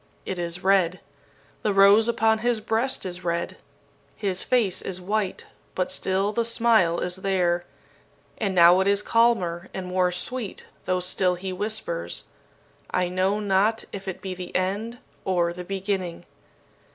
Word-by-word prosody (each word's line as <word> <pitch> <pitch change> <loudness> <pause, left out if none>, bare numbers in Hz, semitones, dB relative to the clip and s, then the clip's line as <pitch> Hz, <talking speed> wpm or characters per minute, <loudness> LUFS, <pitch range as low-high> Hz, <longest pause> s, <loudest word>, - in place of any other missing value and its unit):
It 185 - -4
is 175 +1 -4
red. 185 -2 +3 0.6
The 205 -2 0
rose 200 +3 +6
upon 220 -1 +2
his 240 0 +1
breast 225 +4 0
is 180 -1 -5
red. 170 -1 -2 0.6
His 190 -3 -1
face 230 -8 +2
is 185 -1 -5
white, 200 +1 -2 0.3
but 185 - 0
still 190 +2 0
the 235 - +1
smile 225 -7 +3
is 180 +1 -1
there; 180 -2 0 0.7
and 195 -3 -1
now 175 +1 +7
it 190 - +2
is 200 +1 +2
calmer 190 -8 +2
and 190 - -4
more 180 0 +1
sweet, 225 +4 -4 0.2
though 185 0 0
still 180 0 +1
he 185 +1 -5
whispers, 195 - -3 0.7
'I 180 -1 0
know 190 +3 +1
not 210 +2 +1
if 195 -1 -7
it 190 - -5
be 190 -1 -3
the 180 -1 -8
end 205 +6 -1 0.3
or 175 -2 +1
the 180 +1 -7
beginning!' 190 -2 -3
190 Hz, 150 wpm, -25 LUFS, 180-210 Hz, 0.7 s, now